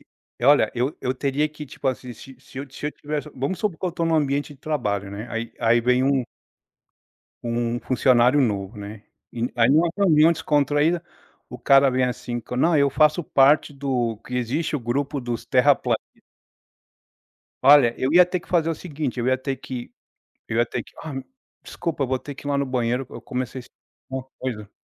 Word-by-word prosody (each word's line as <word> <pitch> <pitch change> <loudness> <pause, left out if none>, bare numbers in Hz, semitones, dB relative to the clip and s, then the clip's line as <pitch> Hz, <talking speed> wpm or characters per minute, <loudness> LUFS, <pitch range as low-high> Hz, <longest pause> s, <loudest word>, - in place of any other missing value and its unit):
E - - -27 0.3
e - - +1
olha, 145 0 +5
eu 125 +4 -1
eu 125 - 0
teria 140 +3 0
que, 150 0 -9
tipo 140 - -7
assim, 125 -1 -2
se 135 +4 -13
se 130 - -18
eu 140 - -5
se 145 - -6
eu 150 - -1
tivesse, 150 0 -5
vamos 140 +8 -2
supor 200 -7 -2
que - - -6
eu 180 - -1
estou 170 0 -2
num 165 - +1
ambiente 145 -1 0
de - - -22
trabalho, 105 -10 -2
né, 105 +4 -6
aí 115 0 -4
aí 120 +1 +4
vem 125 +1 +3
um 135 -1 +2 1.2
um 120 0 -1
funcionário 125 +2 +3
novo, 100 -4 -1
né, 105 +1 -8 0.3
e 120 +1 -2
aí 115 +1 +4
numa 165 +4 +4
reunião 165 -5 +5
descontraída, 150 +1 +1 0.5
o 125 - -9
cara 135 +2 +5
vem 130 0 +1
assim: 120 -1 -4
"Não, 160 +4 +3
eu 140 -1 +3
faço 155 +3 +3
parte 145 +2 +4
do" 125 -6 -2
que 125 - -6
existe 145 +6 -1
o - - -5
grupo 135 +4 -2
dos 120 -2 -4
terraplanistas. - - +3 1.6
Olha, 135 -4 +7
eu 130 - 0
ia 180 +1 +8
ter 180 0 -3
que - - -21
fazer 165 -2 +2
o - - -1
seguinte, 145 -7 -4
eu 120 - -2
ia 130 - +3
ter 135 +1 -4
que 125 -2 -7 0.6
eu 110 - -2
ia 120 - +4
ter - - -4
que: - - -18
"Ah, 155 -3 -6 0.5
desculpa, 155 -5 -3
vou 130 +1 0
ter 145 +3 -8
que 140 - -10
ir - - -1
lá 140 - +1
no 140 - 0
banheiro, 125 0 -1
eu - - -9
comecei 130 -1 -4
a - - -7
sentir - - -22 0.3
uma 130 -1 -4 0.2
coisa". 105 -6 -5
135 Hz, 205 wpm, -23 LUFS, 120-150 Hz, 1.6 s, ia